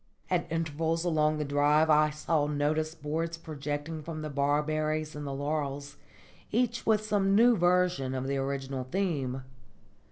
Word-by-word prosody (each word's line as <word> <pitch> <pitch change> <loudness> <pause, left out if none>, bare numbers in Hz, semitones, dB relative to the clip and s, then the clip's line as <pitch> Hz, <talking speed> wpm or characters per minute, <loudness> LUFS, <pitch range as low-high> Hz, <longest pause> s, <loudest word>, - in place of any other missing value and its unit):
At - - 0
intervals 165 +1 -1
along 155 -2 +2
the 150 - -2
drive 145 +2 +3
I 150 0 +5
saw 150 0 0
notice 155 +2 0
boards 165 +2 -3
projecting 150 0 -5
from 155 0 -6
the 155 - -4
barberries 155 +2 0
and 145 -1 -5
the - - -3
laurels, 145 0 -3 0.5
each 235 0 0
with 215 -1 +3
some 200 -2 +2
new 235 +3 +6
version 175 -7 +2
of 130 0 -2
the 140 +1 -1
original 135 -1 -3
theme. 135 -6 -2
155 Hz, 150 wpm, -29 LUFS, 145-165 Hz, 0.5 s, new